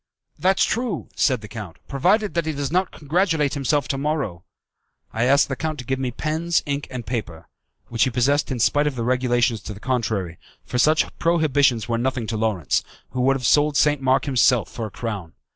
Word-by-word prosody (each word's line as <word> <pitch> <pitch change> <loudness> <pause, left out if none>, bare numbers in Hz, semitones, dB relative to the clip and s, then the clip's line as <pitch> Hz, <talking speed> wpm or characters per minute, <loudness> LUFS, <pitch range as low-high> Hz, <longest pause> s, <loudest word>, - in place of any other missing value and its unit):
"That's 190 +1 +3
true," 230 -7 -2
said 130 -5 +2
the 105 - -9
count, 105 -5 -8
"provided 190 +10 +1
that 170 -2 -1
he 160 - -1
does 140 0 -3
not 185 +2 +1
congratulate 160 -1 0
himself 140 0 0
to 135 - -1
morrow." 140 - -2 0.7
I 115 +2 +1
asked 140 +3 +4
the 135 - -3
count 155 +2 -3
to 125 - -7
give 130 +2 -1
me 130 -1 -1
pens, 160 +6 -1
ink, 145 0 -3
and 125 -3 -6
paper, 105 -10 -5 0.4
which 115 -1 +2
he - - 0
possessed 135 +5 +1
in 130 - -1
spite 145 +5 +2
of 145 - -2
the 120 - -3
regulations 120 -3 +1
to 105 - -7
the - - -11
contrary, 110 -9 -2 0.3
for 125 - -2
such 155 +4 +4
prohibitions 145 -8 +2
were 115 -1 0
nothing 125 -1 -1
to 110 - -3
Lawrence, 105 -10 0 0.3
who 125 - -2
would 135 +2 +3
have 125 -2 -4
sold 145 +3 +3
St. 150 -2 +3
Mark 130 0 +2
himself 125 -4 +2
for 115 -2 -4
a - - -9
crown. 100 -7 -5
130 Hz, 205 wpm, -22 LUFS, 115-150 Hz, 0.7 s, asked